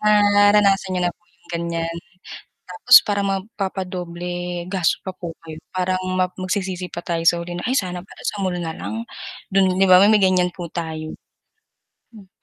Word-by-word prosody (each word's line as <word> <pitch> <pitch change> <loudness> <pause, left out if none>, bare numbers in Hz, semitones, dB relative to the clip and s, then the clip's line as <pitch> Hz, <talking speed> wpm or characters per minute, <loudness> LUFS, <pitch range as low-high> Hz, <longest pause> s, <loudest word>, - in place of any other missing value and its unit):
Naranasan 205 -1 +4
niyo 180 - 0
na - - -13
po - - -46
yung, 170 - -30
ganyan, 170 0 -3 0.7
tapos 445 - +5
parang 200 -1 0
mapa-padoble 180 -3 -4
gasto 185 -2 0
pa 185 - -4
po 175 -2 -7 0.2
kayo, 155 -1 -8
parang 185 0 -1 0.2
mag 180 0 0
magsisisi 185 -1 -3
pa - - -7
tayo 165 -1 -1
sa 170 +1 +4
huli, 175 +1 -6
ay 255 +3 0
sana 180 -2 -4
pala 190 - -15
sa 205 -2 -2
mall 185 -1 -1
nalang. 175 +7 -5 0.5
Dun, 190 -1 +3
'di 195 - +4
ba, 185 0 +7
may 205 - +6
may 210 -2 +4
ganyan 185 -1 +3
po 175 0 -7
tayo. 160 -2 -5 1.0
Mm. 200 -3 -14
185 Hz, 170 wpm, -21 LUFS, 175-195 Hz, 1.0 s, ba